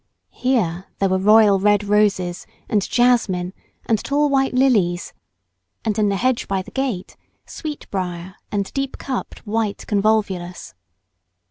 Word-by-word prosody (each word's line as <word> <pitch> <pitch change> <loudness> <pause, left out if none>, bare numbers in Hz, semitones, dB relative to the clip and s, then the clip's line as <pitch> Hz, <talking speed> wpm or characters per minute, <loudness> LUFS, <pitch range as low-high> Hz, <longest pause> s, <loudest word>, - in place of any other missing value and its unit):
Here 195 -9 0
there 195 - +1
were 190 0 +1
royal 210 0 +6
red 205 +1 +3
roses, 200 -4 +1 0.2
and 210 - +2
jasmine, 225 -7 +2 0.3
and 220 -3 +1
tall 290 +1 +1
white 270 -2 +1
lilies, 205 -10 +2 0.7
and 220 -1 0
in 210 -1 +3
the 200 - 0
hedge 255 +4 0
by 190 -1 -1
the - - -13
gate, 260 -9 -3 0.3
sweet 305 -2 -7
brier 180 -1 -4 0.2
and 200 -2 -2
deep 275 -1 -3
cupped 260 -3 -5
white 215 -1 -2
convolvulus. 200 -4 0
210 Hz, 135 wpm, -21 LUFS, 190-245 Hz, 0.7 s, royal